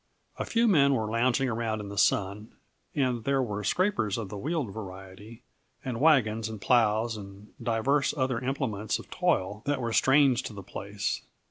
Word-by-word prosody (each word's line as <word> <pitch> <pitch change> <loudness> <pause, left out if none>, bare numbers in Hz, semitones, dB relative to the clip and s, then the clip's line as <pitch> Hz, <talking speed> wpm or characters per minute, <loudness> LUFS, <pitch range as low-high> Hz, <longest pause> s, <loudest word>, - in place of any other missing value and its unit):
A - - -1
few 235 0 +2
men 140 -9 +5
were 110 -3 -2
lounging 125 +3 +2
around 110 -2 -2
in 105 -1 -6
the 100 - -7
sun, 105 +2 +1 0.4
and 125 -5 0
there 140 +2 +1
were 105 -3 -4
scrapers 180 - +1
of 110 -4 -5
the 105 - -6
wheeled 145 - -2
variety, 100 +2 -10 0.4
and 125 -2 -3
wagons, 115 -8 +3
and 110 -1 -7
plows, 115 0 +2
and 100 0 -11
divers 120 +5 +1
other 130 -3 0
implements 125 -5 -2
of - - -13
toil 100 +3 0
that 145 -2 +1
were 115 -2 -2
strange 135 -1 +4
to - - -7
the 100 -1 -8
place. 100 0 -4
115 Hz, 170 wpm, -28 LUFS, 105-135 Hz, 0.4 s, men